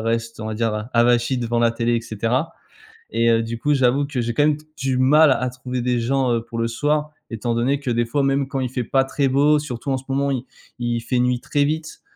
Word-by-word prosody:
restent 115 0 -2
on 110 - -5
va 110 - -3
dire, 115 -1 0
heu, 105 - -2
avachis 120 +2 +3
devant 120 -1 -1
la 115 - +4
télé 115 +1 0
et - - -1
cetera. 115 +6 -2 0.6
Et 115 +1 +2
heu, 115 0 +3
du 115 0 -5
coup, 145 +4 +1
j'avoue 135 +1 +2
que 140 -3 -4
j'ai 120 0 -1
quand 145 - +2
même 150 -1 +3
d 150 - -18
du 135 -1 -1
mal 145 +3 +5
à 125 -1 +1
trouver 125 0 -5
des 125 0 0
gens, 130 +1 +1
heu, 115 - 0
pour 115 0 -8
le 115 0 0
soir, 150 +5 -1 0.2
étant 115 +1 -2
donné 135 +4 +1
que 135 -3 -3
des 120 0 +1
fois 140 +4 0
même 135 0 +1
quand 135 0 -3
il 130 -1 -1
fait 125 0 -3
pas 135 +3 +1
très 140 +1 0
beau 145 +3 +4
surtout 140 -3 -5
en 135 - +1
ce 130 - -9
moment 140 +1 0
il 130 -2 -2 0.4
il 120 -1 -1
fait 125 +2 -1
nuit 125 0 +1
très 145 +3 0
vite 155 +2 -3
125 Hz, 260 wpm, -21 LUFS, 115-140 Hz, 0.6 s, mal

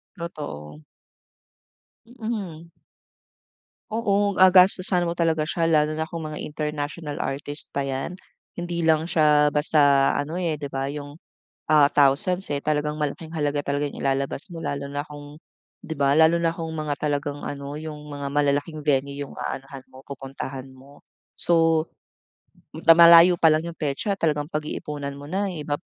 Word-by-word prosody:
Totoo. 75 - -8 1.3
Mm. 210 -9 -6 1.2
Oo, 205 -3 0
gagastusan 185 0 +5
mo 170 - -4
talaga 165 -2 +1
siya. 170 0 0
Lalo 155 -1 +2
na 160 - -1
kung 165 +1 -7
mga 155 0 -6
international 150 0 -4
artist 145 +2 -4
pa 140 - -1
'yan. 135 +4 -3 0.4
Hindi 175 -1 -4
lang 160 0 +3
siya 150 -2 +4
basta 145 -2 +3
ano, 155 +4 -3
eh, 165 -5 -2
'di 145 - -4
ba 135 0 -3
yung, 145 0 -8 0.6
ah, 150 -2 +6
thousands, 150 +7 +2
eh, 145 - 0
talagang 150 0 0
malaking 155 +2 -4
halaga 145 -1 0
talaga 145 +1 -1
yung 145 - -8
ilalabas 135 +4 -1
mo 170 - -8
lalo 140 0 -3
na 145 0 -3
kung 145 0 -11 0.5
'di 160 - -5
ba? 140 -1 +2
Lalo 160 +2 +5
na 165 -1 +2
kung 165 -1 -6
mga 155 -2 -3
talagang 145 -1 -2
ano 140 0 -6
yung 150 -1 -8
mga 145 -1 -6
malalaking 145 +2 0
venue 140 -1 0
yung - - -14
aanuhan 135 0 -6
mo, 130 - -13
pupuntahan 135 -1 -7
mo. 135 +2 -18 0.3
So 165 -1 +3 0.9
na 165 +1 +5
malayo 170 +1 +8
palang 155 -1 +4
yung 170 0 -7
petsa 150 +8 -2
talagang 150 -3 0
pag-iipunan 150 -2 -4
mo 140 +1 -10
na 195 +3 0
yung 170 -5 -5
ibap 145 0 -1
150 Hz, 155 wpm, -24 LUFS, 145-165 Hz, 1.3 s, malayo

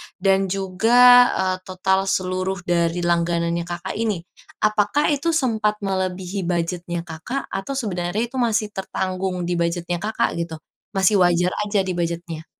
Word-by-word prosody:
dan 195 0 +2
juga, 195 +5 0 0.4
eee, 185 0 0
total 190 +1 0
seluruh 185 0 -1
dari 170 0 0
langganannya 170 0 0
Kakak, 175 +2 -5
ini. 210 -7 -1 0.4
Apakah 215 +8 +2
itu 320 +3 0
sempat 220 -7 +1
melebihi 190 -1 -2
budgetnya 175 0 -2
Kakak 170 +12 -5
atau 195 +8 -3
sebenarnya 195 -3 -2
itu 265 - -6
masih 220 -3 +1
tertanggung 185 -1 -3
di 175 0 -1
budgetnya 170 +1 -1
Kakak 215 +3 0
gitu. 165 -1 -3 0.4
Masih 195 +1 +3
wajar 175 0 +3 0.2
aja 200 -2 +1
di 185 - -3
budget-nya? 170 -2 -4
185 Hz, 140 wpm, -22 LUFS, 175-205 Hz, 0.4 s, Masih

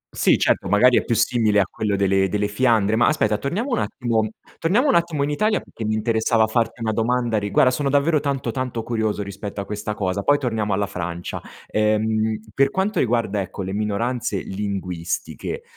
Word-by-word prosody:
Sì, - - +4
certo, - - +1
magari 120 +6 +5
è - - +2
più 115 - 0
simile 110 -2 +2
a 100 - +3
quello 105 -1 -2
delle 95 0 +2
delle 105 +1 0
Fiandre, 110 -1 +2
ma 120 - +4
aspetta, 110 -9 +2
torniamo 205 - -2
un 240 - +1
attimo 115 -4 -1 0.3
torniamo 215 - +2
un - - +4
attimo 170 -4 +1
in 145 - -1
Italia, 215 +7 +1
perché 115 - -8
mi 110 0 0
interessava 110 0 +2
farti 115 +1 -1
una 110 - 0
domanda 115 0 0
rigua 105 -1 +1
guarda, 130 - +5
sono 140 +2 -1
davvero 145 +3 +3
tanto, 140 -4 -2
tanto 125 -2 -3
curioso 110 -3 -1
rispetto 100 +1 -7
a 100 - -3
questa 105 +1 -4
cosa, 95 0 -1
poi 145 +7 +3
torniamo 110 -6 -2
alla 100 +1 +1
Francia. 90 -3 -5 0.2
Ehm, 110 0 0
per 135 +3 +3
quanto 195 +6 -1
riguarda, 115 -4 +1
ecco, 95 +1 -6
le 95 +1 -4
minoranze 105 +1 -1
linguistiche, 95 - -4
110 Hz, 190 wpm, -22 LUFS, 105-125 Hz, 0.3 s, magari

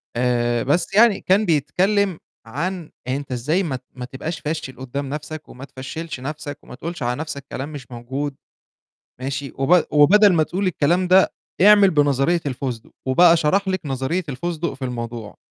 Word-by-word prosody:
آآ 120 -1 +1
بس 170 +8 0
يعني 220 0 +5
كان 200 +3 +3
بيتكلم 180 +5 +1 0.3
عن 165 +7 -4 0.2
أنت 135 +1 -3
إزاي 150 +10 0
ما 145 -6 -2
ت 130 - -9
ما 125 -1 -6
تبقاش 150 +5 -5
فاشل 150 -3 -4
قدّام 135 +2 -5
نفْسك، 150 +1 -6
وما 130 +2 -10
تفشّلش 140 +3 -7
نفْسك 145 +2 -6
وما - - -11
تقولش 165 +1 -6
على 125 +2 -1
نفْسك 140 -3 -6
كلام 135 +3 -4
مش 130 -4 -9
موجود، 135 +4 -4 0.9
ماشي، 135 +1 -4
وب 160 +6 +3
وبدل 195 +8 +6
ما 160 -3 +3
تقول 190 +5 -2
الكلام 175 +2 +1
ده، 185 +1 +5 0.3
اعمل 205 0 +7
بنظرية 145 +2 +2
الفسدق 125 -3 -4 0.2
وبقى 170 +6 +6
شرح 190 +6 +1
لِك 190 -1 0
نظرية 135 +7 -1
الفسدق 170 +4 -3
في 135 - -7
الموضوع. 115 -3 -5
145 Hz, 165 wpm, -21 LUFS, 130-175 Hz, 0.9 s, اعمل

